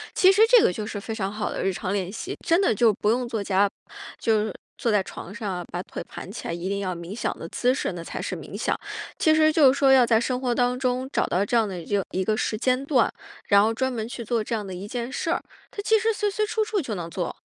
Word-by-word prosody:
其 375 - +6
实 400 +2 +3
这 485 -2 +8
个 - - +4
就 210 +3 -4
是 205 - -4
非 225 +2 -5
常 195 -3 -2
好 210 +1 -3
的 - - -3
日 195 - +1
常 185 +1 -3
练 190 -3 -1
习， 365 - -6
真 335 +1 +4
的 370 - +3
就 230 -1 +4
不 210 - -1
用 245 +1 0
坐 225 -3 -3
家 200 +1 +3 0.5
就 215 -2 +2
是 215 - -4 0.2
坐 235 - -1
在 205 -2 +3
床 190 - -9
上 215 -4 -3
啊， 175 -1 -5
把 180 - -3
腿 - - -7
盘 190 - -8
起 215 - -7
来， - - -2
一 175 +2 -4
定 200 0 -1
要 185 -2 -2
冥 170 +2 -7
想 235 - -2
的 165 - -6
姿 250 +6 +1
势 - - -2
那 175 - -6
才 - - -5
是 - - -3
冥 - - -8
想。 - - -1 0.4
其 315 -1 +4
实 310 0 +5
就 295 -5 +6
是 - - -4
说 275 -1 +5
要 260 -2 +7
在 225 -1 +4
生 250 +1 -1
活 250 -2 0
当 245 +1 +1
中 255 0 0
找 - - +1
到 185 +3 +1
这 235 - +1
样 225 -2 +3
的 185 -3 -5
一 205 - -6
热 200 - +2
一 190 - 0
个 215 +3 0
时 215 - -1
间 255 +3 +1
段， 265 -5 +3 0.4
然 200 0 +6
后 220 +1 +2
专 260 +3 -1
门 225 -3 -3
去 235 0 -6
做 230 +1 0
这 230 - -2
样 210 -2 -3
的 190 - -6
一 185 +3 -6
件 240 +2 -4
事 325 - -2
儿， - - 0 0.3
它 405 - -5
其 440 +1 +4
实 450 +2 +1
随 420 0 0
随 425 +2 0
处 435 +1 0
处 425 -1 -1
就 235 -8 -4
能 170 -2 -5
做。 175 0 -4
225 Hz, 315 characters per minute, -25 LUFS, 200-260 Hz, 0.5 s, 这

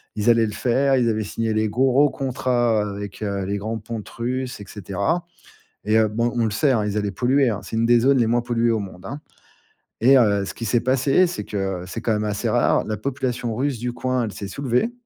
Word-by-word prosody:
Ils 105 +2 +1
allaient 115 -1 +5
le 105 - -3
faire. 135 +5 +2
Ils 120 -2 +2
avaient 110 -1 0
signé 110 +2 -2
les 110 0 +1
gros 130 +5 +3
contrats 125 -4 0
avec, 100 0 -7
heu, 100 -2 -2
les 100 +2 -2
grands 110 +3 -4
pontes 110 0 -7
Russes, 125 +1 -4
et 100 - -9
cetera. 100 - -2 0.6
Et 105 +2 +3
heu, 110 -1 +3
bon, 115 +3 -1
on 120 -1 +1
le 110 - 0
sait, 135 +7 +2
hein, 110 -4 +1
ils 105 0 -1
allaient 105 -1 -1
polluer, 130 +6 +2
hein, 105 -2 -3
c'est - - -6
une 115 +1 +2
des 120 0 +5
zones 135 +3 +4
les 120 - +3
moins 120 +2 +2
polluées 120 -1 +1
au 110 - 0
monde, 95 -2 -9
hein. 140 +8 -6 0.8
Et 130 +4 +6
heu, 100 -5 +3
ce - - -6
qui 115 - -6
s'est 115 +2 +2
passé, 135 +7 +3
c'est 175 0 -4
que, 95 -3 -3
c'est 115 +4 -6
quand 115 - 0
même 105 0 -1
assez 105 -1 -2
rare, - - +2
la 110 -1 -3
population 125 -1 -3
Russe 135 -1 -1
du 120 +1 -3
coin, 130 -1 -1
elle 105 - -5
s'est 100 - -6
soulevée. 135 - 0
115 Hz, 240 wpm, -22 LUFS, 105-130 Hz, 0.8 s, Et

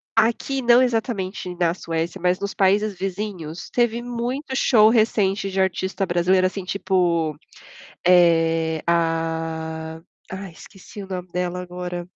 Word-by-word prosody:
Aqui, 235 +4 +1
não 240 +1 +6
exatamente 205 -7 -2
na 170 -1 +1
Suécia, 165 +1 -4
mas 180 0 +2
nos 200 0 -4
países 205 +2 +2
vizinhos, 185 -4 -5
teve 240 -1 +1
muito 245 +4 -4
show 220 -5 +5
recente 210 -3 +2
de 190 0 -3
artista 190 +1 0
brasileira, 185 +2 +2
assim, 185 0 -6
tipo, 175 -6 0 0.7
eh, 165 -2 +3
ah, 165 -1 -1 0.3
ai 190 -1 -6
esqueci 195 +4 -12
o - - -10
nome 185 -1 -5
dela 180 0 -2
agora. 180 -1 -6
185 Hz, 130 wpm, -22 LUFS, 170-210 Hz, 0.7 s, não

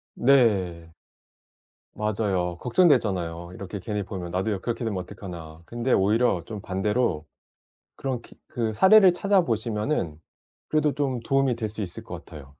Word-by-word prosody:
네. 100 -11 +3 1.1
맞아요. 95 -5 -1
걱정되잖아요. 100 - +2
이렇게 100 +1 -6
괜히 105 +2 -3
보면 95 -3 -6
'나도 95 +5 -1
요 100 - -1
그렇게 120 0 -3
되면 105 -4 -2
어떡하나.' 85 -4 -9
근데 120 +4 -2
오히려 105 -2 +2
좀 105 -1 -7
반대로 95 -4 0 0.7
그런 130 -3 -3
기 - - -17
그 115 -2 -2
사례를 190 - +7
찾아보시면은 115 - 0 0.5
그래도 155 -1 +2
좀 135 -4 -1
도움이 135 0 +2
될 115 -2 -3
수 110 +1 -6
있을 90 -4 -6
것 - - -8
같아요. 70 -3 -11
105 Hz, 315 characters per minute, -25 LUFS, 90-125 Hz, 1.1 s, 사례를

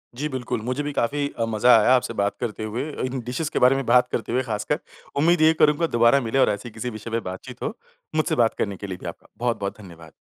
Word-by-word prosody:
जी 145 +5 -2
बिल्कुल। 130 -4 -3
मुझे 135 +3 -1
भी 145 - -3
काफ़ी 140 +3 0
अ, 115 - +2
मज़ा 115 +2 +5
आया 115 +4 +4
आपसे 125 -2 -1
बात 100 0 0
करते 110 -3 -3
हुए 115 +7 -3 0.2
इन 130 +1 -3
डिशेज़ 130 +6 -2
के - - +1
बारे 125 +2 +5
में 135 -1 -2
बात 125 +1 +5
करते 115 - -2
हुए 125 +2 +2
ख़ासकर। 110 +6 -2 0.4
उम्मीद 165 +3 +3
यही 160 +1 +6
करूँगा 150 +2 +4
दोबारा 120 +4 +5
मिले 135 - +1
और - - +5
ऐसे 105 +4 -3
किसी 115 +2 -5
विषय 110 0 -8
पे 115 - +1
बातचीत 95 0 -9
हो। - - -2 0.4
मुझसे 155 - +1
बात 115 -2 +3
करने 100 -2 -2
के 100 - -7
लिए 95 -2 -5
भी - - -10
आपका - - -9
बहुत-बहुत 115 -5 -2
धन्यवाद! 85 -5 -13
120 Hz, 245 wpm, -24 LUFS, 110-135 Hz, 0.4 s, यही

